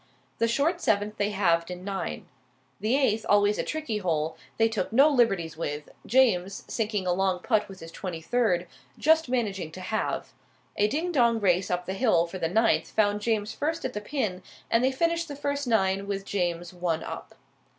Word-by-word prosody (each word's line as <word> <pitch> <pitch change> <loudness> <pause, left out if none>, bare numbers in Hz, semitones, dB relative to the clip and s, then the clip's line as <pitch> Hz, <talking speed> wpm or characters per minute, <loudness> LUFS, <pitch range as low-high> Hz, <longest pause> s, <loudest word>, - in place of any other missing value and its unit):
The 230 - +3
short 300 +9 +1
seventh 210 -4 +1
they 205 0 +1
halved 170 -5 +1
in 180 0 -7
nine. 195 0 -4 0.5
The 220 +4 +1
eighth, 225 -6 +2
always 205 0 +4
a - - +1
tricky 305 -9 -3
hole, 160 -4 -1 0.2
they 225 - +4
took 220 -4 -2
no 270 +6 +6
liberties 195 - +2
with, 150 -2 -4 0.2
James, 200 -7 +2
sinking 210 -4 -1
a 180 - +2
long 190 0 +1
putt 210 +2 0
with 190 -1 -11
his 165 0 -9
twenty 175 -2 -5
third, 180 -2 +1 0.3
just 320 -2 +3
managing 200 -10 -1
to 185 - -8
halve. 215 +4 -2 0.4
A 205 - +3
ding 320 +10 -1
dong 235 -7 +3
race 185 -2 +2
up 180 0 -1
the 190 - -3
hill 195 -6 +3
for 185 +2 -7
the 165 - 0
ninth 225 +5 +2
found 210 -1 +1
James 215 -1 0
first 320 +3 -2
at 255 - -3
the 210 - -4
pin, 210 -7 -2 0.3
and 230 +1 +3
they 260 - +3
finished 335 +4 0
the 290 - -6
first 285 -1 -2
nine 195 -3 +1
with 195 -1 -3
James 175 -3 -2
one 175 -3 -1
up. - - -8
205 Hz, 190 wpm, -27 LUFS, 180-245 Hz, 0.5 s, no